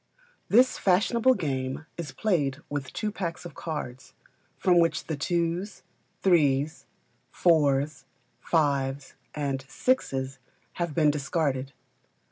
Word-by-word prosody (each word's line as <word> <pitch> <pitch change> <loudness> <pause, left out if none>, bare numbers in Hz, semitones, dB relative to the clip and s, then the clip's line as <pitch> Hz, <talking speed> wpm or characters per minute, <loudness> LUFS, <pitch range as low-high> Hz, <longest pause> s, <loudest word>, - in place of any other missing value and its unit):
This 250 +4 +5
fashionable 230 +7 +3
game 135 - -3
is 165 -5 -5
played 150 -11 0
with 145 -2 -4
two 215 -1 -2
packs 175 -4 -4
of 175 - -8
cards, 130 -6 -6 0.4
from 180 -2 +4
which 165 0 +2
the 160 - -2
twos, 170 +6 -2 0.4
threes, 155 -4 +2 0.4
fours, 150 -3 +2 0.3
fives, 140 -4 0 0.2
and 140 -3 -2
sixes, 135 - -1 0.4
have 170 -3 -2
been 155 -3 +4
discarded. 140 -2 -1
155 Hz, 105 wpm, -27 LUFS, 135-175 Hz, 0.4 s, This